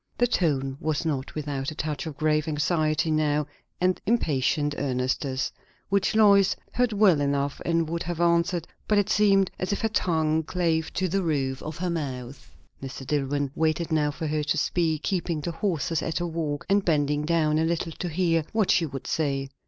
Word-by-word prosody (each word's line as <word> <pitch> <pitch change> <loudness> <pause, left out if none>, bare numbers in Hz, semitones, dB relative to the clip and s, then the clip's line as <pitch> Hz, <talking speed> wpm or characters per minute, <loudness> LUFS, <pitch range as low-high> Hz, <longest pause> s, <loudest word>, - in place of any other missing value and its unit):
The 245 - +4
tone 140 - 0
was 155 +1 -1
not 140 -4 -2
without 140 -3 -3
a 155 - -7
touch 155 0 -3
of 150 -3 -7
grave 155 0 +1
anxiety 155 +1 +1
now, 150 -1 +1 0.3
and 185 0 +1
impatient 145 - +1
earnestness, 130 0 -1 0.4
which 200 +1 +1
Lois 200 -3 +5 0.2
heard 245 -1 +2
well 200 -7 +4
enough 140 0 -1
and 165 -1 +1
would 170 +1 -3
have 175 -1 -4
answered; 170 0 +2 0.2
but 210 - +3
it 205 0 +2
seemed 195 -2 +4
as 185 - -2
if 200 - -1
her 225 - +1
tongue 160 -6 +1
clave 160 -1 -1
to 185 - 0
the 195 +3 0
roof 135 -6 -1
of 155 +1 -6
her 180 0 -2
mouth. 135 -5 -5 0.3
Mr. 135 0 -7
Dillwyn 145 0 -1
waited 160 +2 0
now 150 -2 +2
for 155 +2 -5
her 155 0 0
to 145 - 0
speak, 160 -3 0
keeping 175 -4 -1
the 160 +3 -3
horses 165 -4 -1
at 165 - -2
a 175 - -1
walk, 160 -4 -3
and 200 +1 +3
bending 150 -3 +1
down 155 -1 +2
a - - +2
little 165 0 -1
to 180 - -2
hear 165 -1 +1
what 220 -3 +2
she 165 - +3
would 135 -2 -7
say. 135 -3 -1
160 Hz, 190 wpm, -26 LUFS, 145-175 Hz, 0.4 s, Lois